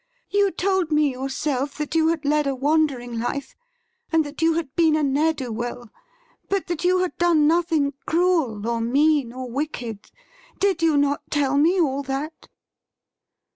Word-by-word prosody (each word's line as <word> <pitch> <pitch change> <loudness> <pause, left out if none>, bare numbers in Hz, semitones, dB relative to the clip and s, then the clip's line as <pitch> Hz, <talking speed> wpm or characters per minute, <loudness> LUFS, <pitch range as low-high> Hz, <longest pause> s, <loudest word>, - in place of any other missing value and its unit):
You 405 -1 +3
told 375 -2 0
me 300 -2 +3
yourself 270 +1 -3
that 300 -1 -4
you 320 -1 +3
had 325 -2 -1
led 300 0 +2
a 275 - 0
wandering 270 -4 0
life, 265 +3 -4 0.6
and 325 -1 +3
that 290 +3 -8
you 325 0 +3
had 315 -5 -4
been 325 -2 +3
a 310 - +1
ne'er 290 +3 +2
do 265 -6 -6
well, 240 0 -5 0.6
but 395 -1 0
that 345 -1 -4
you 365 +1 +3
had 365 - -3
done 340 -4 +4
nothing 320 -3 +2
cruel, 320 - +1
or 235 -1 -1
mean, 280 +1 +2
or 255 +1 -6
wicked. 240 -5 -5 0.5
Did 385 -4 +1
you 320 -3 +3
not 285 0 +1
tell 285 -2 +1
me 330 +6 +3
all 280 -4 +1
that 280 +4 -5
295 Hz, 170 wpm, -23 LUFS, 265-325 Hz, 0.6 s, done